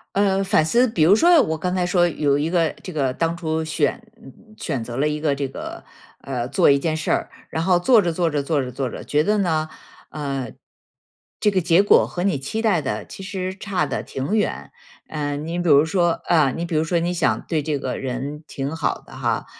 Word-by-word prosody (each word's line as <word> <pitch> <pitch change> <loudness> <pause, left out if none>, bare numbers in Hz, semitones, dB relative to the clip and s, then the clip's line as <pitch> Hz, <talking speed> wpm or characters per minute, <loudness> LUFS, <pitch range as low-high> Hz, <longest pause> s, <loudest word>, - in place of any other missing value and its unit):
呃， 195 -1 +2
反 190 -6 +2
思， 240 +8 +3
比 165 -7 +1
如 190 +6 +6
说， 340 +4 +6
我 160 -7 -1
刚 180 +3 -2
才 180 -1 0
说 175 0 +3
有 145 -4 +1
一 155 +3 -1
个， 170 -3 +2
这 185 - -6
个 140 -6 0
当 165 +4 -1
初 160 -2 -2
选， 160 - -1 0.2
嗯， - - -13 0.2
选 135 -8 -3
择 120 +1 -6
了 145 +3 +2
一 150 0 -2
个 150 -3 +1
这 140 0 -2
个 - - -8 0.3
呃， 125 -2 -4
做 140 - +4
一 140 - +5
件 155 +2 -1
事 160 - -2
儿， - - 0 0.2
然 160 - -2
后 180 0 +3
做 225 +4 +5
着 175 -2 0
做 170 0 0
着 145 -2 -1
做 145 -1 0
着 125 -2 -6
做 130 -1 -2
着， - - -8
觉 150 +1 +1
得 210 +3 +1
呢， 160 -5 0 0.4
呃， 135 -5 -4 0.9
这 210 - +3
个 190 -2 +1
结 170 +3 +4
果 205 - +5
和 175 - -4
你 190 -7 +1
期 140 +12 -4
待 205 -8 +2
的 - - -3
其 195 - -10
实 190 -1 -4
差 190 -5 -1
得 135 - -3
挺 135 +11 -3
远。 215 - -1 0.4
嗯， 145 0 -4
你 170 +1 -3
比 175 - 0
如 145 +1 +6
说， 175 +1 +2 0.2
啊， 155 -6 +3
你 170 +4 -4
比 170 - -4
如 155 - +2
说 170 +1 0
你 175 +1 -1
想 175 -1 +1
对 155 -3 -1
这 145 -1 -1
个 130 -2 -3
人 135 +4 -5
挺 140 +3 -4
好 160 - -1
的 - - -15
哈， - - -1
160 Hz, 250 characters per minute, -22 LUFS, 145-180 Hz, 0.9 s, 如